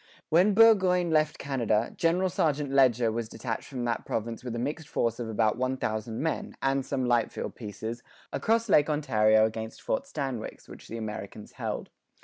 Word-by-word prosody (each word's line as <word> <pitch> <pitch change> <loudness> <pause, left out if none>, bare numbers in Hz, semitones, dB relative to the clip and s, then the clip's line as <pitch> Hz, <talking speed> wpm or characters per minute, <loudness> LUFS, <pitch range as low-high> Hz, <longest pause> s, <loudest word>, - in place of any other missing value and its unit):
When 185 +5 +4
Burgoyne 185 -6 +5
left 155 -1 +2
Canada, 120 -5 0
General 180 +3 +2
St. 150 -4 0
Leger 125 -4 +4
was 115 0 -3
detached 115 -2 -4
from 125 -3 -4
that 115 -1 -1
province 115 +1 -4
with 120 -2 -4
a - - -3
mixed 145 +5 -3
force 115 0 0
of 115 -2 -4
about 110 +1 +1
one 130 +1 0
thousand 110 +1 -3
men, 160 - -3
and 135 0 +1
some 130 -1 -2
light 120 -2 +2
field - - -5
pieces, 110 +2 -6 0.3
across 230 +1 +1
Lake 150 -6 +4
Ontario 110 -8 +3
against 110 0 -5
Fort 275 0 -1
Stanwix, 135 - -5
which - - -12
the 115 - -6
Americans 105 -1 -6
held. - - -5
125 Hz, 175 wpm, -28 LUFS, 110-155 Hz, 0.3 s, Burgoyne